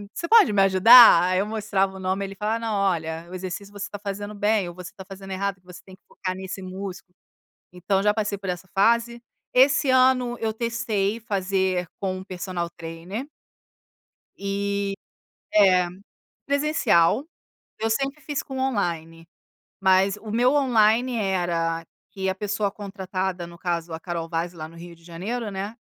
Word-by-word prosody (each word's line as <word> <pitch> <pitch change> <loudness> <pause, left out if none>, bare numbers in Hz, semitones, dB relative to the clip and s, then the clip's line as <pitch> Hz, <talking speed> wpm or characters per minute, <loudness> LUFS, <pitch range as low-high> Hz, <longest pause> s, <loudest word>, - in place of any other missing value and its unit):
"Você - - -3
pode 440 - +6
me 195 - +4
ajudar?" 195 +1 +8
Aí 185 +1 +1
eu 200 - +1
mostrava 200 -3 -1
o - - -9
nome 190 +1 -1
ele 195 0 -5
falava: 215 +3 -1
"Não, 225 -2 -3
olha, 170 -4 -1
o 185 - -8
exercício 190 +2 -6
você 205 0 -6
tá 205 - -7
fazendo 205 +1 -5
bem 205 -2 +1
ou 175 - -11
você 180 -1 -9
tá 190 - -9
fazendo 195 0 -10
errado, 195 0 -2
que 180 - -35
você 180 -1 -11
tem 190 -1 -14
que - - -49
focar 185 -1 -4
nesse 190 +1 -7
músculo." 185 0 -8 0.6
Então 190 +2 -1
já 210 0 +3
passei 210 -2 -2
por 195 -1 -6
essa 180 +1 -4
fase, 235 +3 +2 0.3
esse 275 +2 +4
ano 255 -2 +3
eu 220 -1 0
testei 230 -2 -1
fazer 190 -4 -1
com 185 -1 -3
personal 180 -2 -4
trainer. 170 +8 -6 1.1
E, 200 0 -2 0.6
é, 185 -4 +5 0.6
presencial, 280 - +2 0.5
eu 225 +1 -1
sempre 275 +5 -1
fiz 290 -3 -3
com 265 -1 -7
online, 165 -10 -2 0.6
mas 190 +1 +3
o 215 0 -8
meu 245 +4 +3
online 245 -3 +3
era 175 -5 -1 0.3
que 190 -1 -2
a 190 - -2
pessoa 205 0 -2
contratada 190 -3 -4
no 170 0 -13
caso 170 -2 -3
a 160 - -5
Carol 170 -1 -4
Vaz 170 +1 -3
lá 155 -2 -7
no 165 - -16
Rio 170 0 -11
de 165 - -24
Janeiro, 205 +7 -4
né, 200 +3 -5
195 Hz, 170 wpm, -24 LUFS, 180-220 Hz, 1.1 s, ajudar